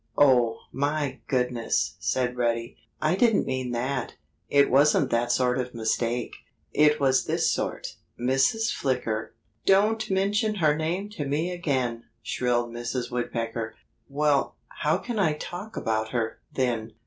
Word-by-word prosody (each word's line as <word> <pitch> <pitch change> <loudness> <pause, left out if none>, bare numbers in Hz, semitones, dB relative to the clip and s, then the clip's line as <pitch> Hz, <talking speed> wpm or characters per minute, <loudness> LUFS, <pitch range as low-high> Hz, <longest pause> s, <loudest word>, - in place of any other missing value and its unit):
"Oh, 125 -5 +5
my 145 0 -1
goodness!" 125 - 0
said 125 -1 0
Reddy. 115 -1 -1 0.2
"I 155 +3 +2
didn't 225 +1 +3
mean 130 -1 -2
that. 125 +1 -2 0.3
It 140 0 +4
wasn't 140 0 +4
that 120 +1 +1
sort 125 0 +2
of 125 -1 -4
mistake. 115 +1 -1 0.4
It 150 0 +4
was 135 -2 +3
this - - +1
sort: - - -4 0.2
Mrs. 135 - +2
Flicker——" 115 -5 -2 0.3
"Don't 215 +3 +3
mention 205 +3 +1
her 155 -6 +3
name 175 +6 -2
to 150 -8 -4
me 155 +6 0
again!" 130 -9 -1 0.2
shrilled 120 -1 0
Mrs. 120 +1 -4
Woodpecker. 115 -2 -3 0.3
"Well, 145 0 +1
how - - 0
can 235 -3 -4
I 160 -6 +3
talk 180 +7 -7
about 110 0 -1
her, 115 -2 -1
then?" 115 -4 -1
130 Hz, 135 wpm, -26 LUFS, 120-155 Hz, 0.4 s, Oh